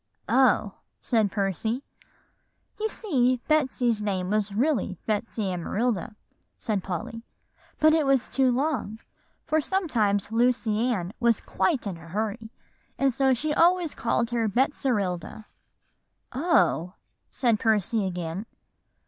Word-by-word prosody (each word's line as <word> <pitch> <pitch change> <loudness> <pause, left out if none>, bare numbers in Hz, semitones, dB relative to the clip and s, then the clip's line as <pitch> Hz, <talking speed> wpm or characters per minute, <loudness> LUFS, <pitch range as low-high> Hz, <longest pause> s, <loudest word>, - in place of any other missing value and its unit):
"Oh!" 255 -6 +3 0.2
said 220 -4 +1
Percy. 220 - -1 1.0
"You 440 +1 0
see, 255 - +1
Betsy's 255 -7 +1
name 190 -3 -2
was 210 -1 0
really 230 -3 0
Betsy 220 +1 -2
Amarilda," 210 +3 -2 0.4
said 205 -4 -2
Polly; 225 +5 -5 0.6
"but 310 0 +5
that 310 -3 +2
was 270 -3 +3
too 265 -2 +2
long, 255 -5 -1 0.5
for 315 0 +1
sometimes 225 - 0
Lucy 230 -2 +1
Ann 185 -4 -3
was 235 -2 +3
in - - -27
quite 290 -11 0
a 200 - -3
hurry, 205 +7 -4 0.5
and 270 -1 +2
so 265 +1 +3
she 300 +5 -2
always 345 0 +3
called 235 0 -1
her 230 -2 +1
Betserilda." 215 - -1 0.9
"Oh!" 255 - +2 0.3
said 235 -5 +1
Percy 215 -1 +1
again. 175 +3 -4
230 Hz, 120 wpm, -26 LUFS, 205-265 Hz, 1.0 s, but